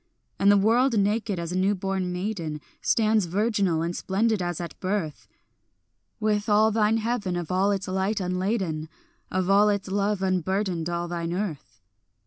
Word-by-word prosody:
And 200 +1 +5
the 205 - +5
world 230 +4 +3
naked 205 0 +1
as 170 0 -4
a - - -3
new 195 +2 +2
born 190 -1 -2
maiden 180 -5 -3 0.2
Stands 220 -3 +2
virginal 195 -3 +1
and 170 +1 -2
splendid 210 +2 0
as 175 -2 -2
at 170 -1 -7
birth, 185 -5 -3 0.9
With 210 -1 0
all 215 +1 +4
thine 220 0 +2
heaven 220 -5 -1
of 175 -2 -4
all 190 +2 +2
its 195 -2 -1
light 190 +3 0
unladen, 180 -4 -2 0.4
Of 185 -1 -1
all 200 +2 +5
its 200 -2 -1
love 200 0 0
unburdened 185 -2 0
all 175 0 -2
thine 170 -1 -3
earth. 160 - -5
195 Hz, 160 wpm, -26 LUFS, 175-210 Hz, 0.9 s, And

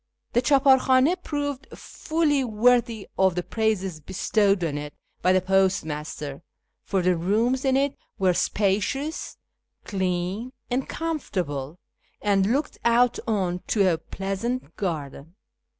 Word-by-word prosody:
The 240 - +3
chdpAr 270 -1 +5
l^Jidnd 265 +8 +3
proved 285 -3 -3
fully 310 -4 0
worthy 235 -1 +2
of 190 -2 +4
the 180 - -1
praises 195 -4 -1
bestowed 195 +3 +1
on 155 -3 -1
it 145 0 -6 0.3
by 185 - +3
the 185 0 +4
postmaster, 160 -6 -1 0.4
for 190 -3 0
the 180 0 +3
rooms 220 +9 +1
in 265 -1 +3
it 280 0 +1 0.2
were 185 -2 +3
spacious, 215 - -1 0.5
clean, 190 +5 -2 0.2
and 260 +2 -1
comfortable, 180 - -3 0.4
and 200 0 +2
looked 285 +4 -1
out 235 +1 +3
on 185 -5 0
to 195 -5 +3
a 160 - -3
pleasant 195 +9 -4
garden. 160 -3 -4
200 Hz, 125 wpm, -25 LUFS, 180-255 Hz, 0.5 s, chdpAr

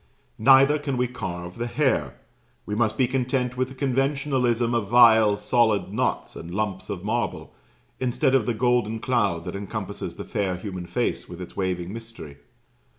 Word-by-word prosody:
Neither 135 +5 +6
can 140 -3 -3
we 125 0 +1
carve 90 -6 -6
the 120 - -1
hair. 120 - 0 0.5
We 105 - -4
must 110 0 0
be 130 - +3
content 125 -1 -1
with 130 0 0
the 130 - -11
conventionalism 130 -3 0
of 115 -4 0
vile 110 -2 +6
solid 105 -3 +1
knots 125 +3 -1
and 80 - -8
lumps 100 +1 -3
of 95 -3 -5
marble, 115 +3 -2 0.5
instead 130 +2 +1
of 130 -5 +3
the 120 - 0
golden 120 -2 +1
cloud 105 -9 0
that 90 - -5
encompasses 100 0 -5
the - - -7
fair 95 -3 -1
human 95 -2 -6
face - - -2
with 90 0 -9
its 90 - -9
waving 90 -1 -2
mystery. 115 -11 -10
115 Hz, 165 wpm, -24 LUFS, 100-125 Hz, 0.5 s, Neither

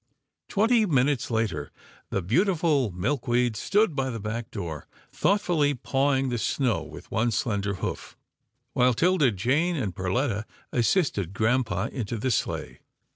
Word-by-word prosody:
Twenty 220 +1 +3
minutes 135 -4 +2
later, 110 - -1 0.4
the 100 - -1
beautiful 155 - +2
Milkweed 120 +4 0
stood 200 - +2
by 135 -1 0
the 115 -2 -4
back 110 +2 -4
door, 85 -8 -6 0.2
thoughtfully 170 -8 +2
pawing 135 +1 +1
the 120 -1 -1
snow 125 -2 0
with - - -11
one 110 +3 +1
slender 100 -1 -1
hoof, - - -5 0.6
while 125 -1 +3
'Tilda 165 0 +3
Jane 135 - +1
and 105 - -2
Perletta 105 +4 -1 0.3
assisted 120 - +1
grampa 115 +2 +1
into 115 -3 -3
the 130 +4 -1
sleigh. 105 - -2
125 Hz, 130 wpm, -26 LUFS, 105-145 Hz, 0.6 s, Twenty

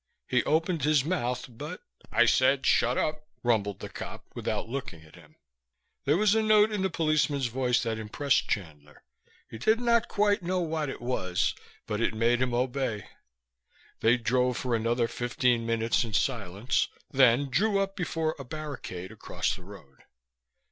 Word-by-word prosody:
He 125 - +2
opened 165 0 +1
his 145 -2 +3
mouth, 125 -8 -1
but, 145 +9 -8 0.3
"I 120 - +5
said, 130 +3 +3
'Shut 120 +1 +3
up.'" 155 0 -2 0.2
rumbled 105 -5 0
the - - -5
cop - - -8
without - - -3
looking 120 - -6
at 80 0 -18
him. 75 -3 -17 0.7
There 145 +4 +3
was 210 +1 +4
a 220 - +3
note 215 0 +5
in 210 -2 -1
the 190 - +1
policeman's 155 -4 +1
voice 125 0 +1
that 115 -2 -2
impressed 130 +6 0
Chandler. 75 -7 -5 0.4
He 110 - -9
did 220 - +3
not 235 -1 +2
quite 205 0 +2
know 180 +1 -1
what 160 -4 -2
it 130 - -7
was, 95 -8 0 0.3
but 105 +1 -3
it 115 - +1
made 120 +2 +2
him 130 -1 +1
obey. 125 -4 -2 0.9
They 115 +2 +4
drove 125 +1 +1
for 125 -2 -2
another 115 +1 +1
fifteen 120 -1 0
minutes 115 0 +1
in 115 -2 -6
silence, 110 -1 0 0.2
then 130 +1 +4
drew 200 - +2
up 195 0 -1
before 165 -3 -1
a - - -5
barricade 130 - -7
across 90 -5 -2
the 95 - -12
road. 85 -9 -14
125 Hz, 165 wpm, -28 LUFS, 115-155 Hz, 0.9 s, I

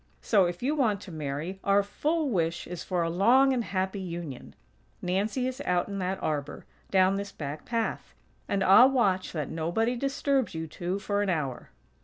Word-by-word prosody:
So, 200 -4 +4
if 175 +5 -4
you 280 +4 +1
want 230 -9 +1
to 190 - -10
marry, 155 +4 -4
our 200 0 +4
full 300 +8 -1
wish 165 -4 0
is 180 -1 -6
for 180 -2 -1
a 165 - -1
long 250 +9 +5
and 245 -2 0
happy 190 0 -2
union. 170 -8 -7 0.4
Nancy 205 +8 -1
is 260 +2 -5
out 180 -7 0
in 200 -1 -4
that 185 +1 -1
arbor, 145 -2 -3 0.2
down 190 0 +3
this 200 0 -5
back 150 -2 -6
path; 230 -2 -3 0.3
and 195 -1 +1
I'll 230 +8 +8
watch 200 -8 +1
that 150 -4 -3
nobody 175 +10 0
disturbs 275 - 0
you 160 0 -3
two 175 +4 -3
for 205 0 -1
an 205 - 0
hour." 145 -8 -2
190 Hz, 185 wpm, -28 LUFS, 170-230 Hz, 0.4 s, I'll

